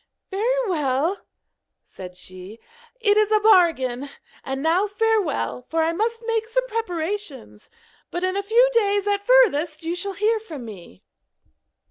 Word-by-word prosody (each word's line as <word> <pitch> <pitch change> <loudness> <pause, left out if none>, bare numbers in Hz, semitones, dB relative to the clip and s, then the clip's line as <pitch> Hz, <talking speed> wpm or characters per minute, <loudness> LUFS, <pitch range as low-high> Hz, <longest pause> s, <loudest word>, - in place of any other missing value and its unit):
'Very 485 +5 0
well,' 310 +1 0 0.6
said 180 -1 -11
she, 185 +4 -8 0.4
'it 420 -3 +3
is 430 0 +3
a 430 - +5
bargain; 325 - +3 0.3
and 270 +1 -4
now 350 +6 +2
farewell, 410 - 0
for 325 0 +1
I 325 +1 0
must 455 +5 -2
make 450 -1 -1
some - - 0
preparations; 355 - -4 0.4
but 350 - -4
in 370 +1 0
a 400 - 0
few 460 +5 +4
days 410 -3 +2
at 405 -1 0
furthest 350 -10 +3
you 330 +1 -2
shall 395 +2 -3
hear 435 +3 +1
from 315 - -9
me.' 180 - -12
385 Hz, 145 wpm, -23 LUFS, 295-435 Hz, 0.6 s, a